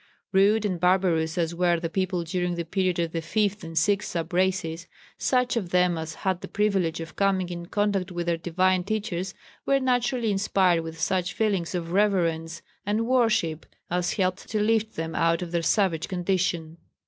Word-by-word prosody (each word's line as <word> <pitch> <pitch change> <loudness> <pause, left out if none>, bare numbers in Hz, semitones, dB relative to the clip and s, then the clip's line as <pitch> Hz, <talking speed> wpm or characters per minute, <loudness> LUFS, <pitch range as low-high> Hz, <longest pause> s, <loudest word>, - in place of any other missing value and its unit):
Rude 205 +3 +4
and 185 -4 -1
barbarous 180 -2 +2
as 170 -1 0
were 175 -1 +2
the 165 - -2
people 185 0 -1
during 175 +1 -2
the 170 -1 -3
period 185 +1 0
of 170 -1 -1
the 165 - -2
fifth 205 +4 0
and 165 0 -7
sixth 200 +5 +2
sub 170 0 -4
races, 180 -2 0 0.3
such 250 -1 +1
of 200 -7 -2
them 180 -1 +3
as 160 0 -5
had 185 -2 +1
the - - -6
privilege 195 -6 0
of 165 -1 -8
coming 190 -2 +1
in 170 -1 -6
contact 200 -2 0
with 175 -1 -3
their 170 -1 +1
divine 180 +2 +1
teachers 195 -3 -3 0.3
were 275 0 +2
naturally 245 -3 +1
inspired 190 -3 +2
with 165 0 -8
such 180 +2 0
feelings 195 -6 0
of 170 -1 -3
reverence 170 -5 +1 0.2
and 210 +3 0
worship 225 -10 +1 0.2
as 180 0 0
helped 185 -2 -1
to 215 - -1
lift 220 +1 +1
them 160 0 -4
out 165 +1 +1
of 170 - -7
their 170 -1 0
savage 170 -2 +1
condition. 175 -3 -1
180 Hz, 185 wpm, -26 LUFS, 170-200 Hz, 0.3 s, Rude